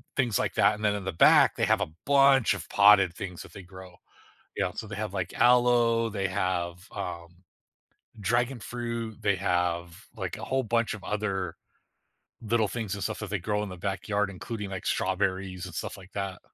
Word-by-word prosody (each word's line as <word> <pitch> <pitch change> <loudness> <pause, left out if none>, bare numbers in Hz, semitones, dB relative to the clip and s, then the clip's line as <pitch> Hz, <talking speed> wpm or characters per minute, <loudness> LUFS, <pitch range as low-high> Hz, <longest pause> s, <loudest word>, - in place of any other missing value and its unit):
things 120 -6 +1
like - - -1
that, - - +4
and 105 - -8
then 105 -1 +2
in 100 - -5
the 95 - -2
back, 80 - +6
they - - +1
have - - +2
a - - -2
bunch 135 -2 +5
of - - -8
potted 100 -3 +6
things 90 -1 -7
that - - -15
they 100 - -9
grow, 95 -1 -13 0.6
yeah, - - 0
so 110 - -6
they 105 - -7
have, 105 -1 -4
like, 95 -3 -3
aloe, 120 -1 +4
they 95 -2 -2
have, 90 -2 -2
um, 85 +1 -7 0.8
dragon 120 +5 0
fruit, 115 -1 -5
they 100 -2 +2
have, 90 0 -1
like, 95 -5 -4
a - - -6
whole 130 0 0
bunch 115 0 0
of 105 - -10
other 95 -4 -2 0.9
little 115 -1 +1
things 110 -3 -4
and 100 - -4
stuff 110 - -2
that 105 - -6
they 100 - -1
grow 105 +4 -1
in 105 - -5
the 90 - -7
backyard, 100 +2 -1
including, 105 +2 -6
like, 95 -1 -6
strawberries 95 -1 -1
and 90 - -9
stuff - - -5
like 95 -1 -14
that. 100 -2 -4
100 Hz, 195 wpm, -28 LUFS, 95-115 Hz, 0.9 s, back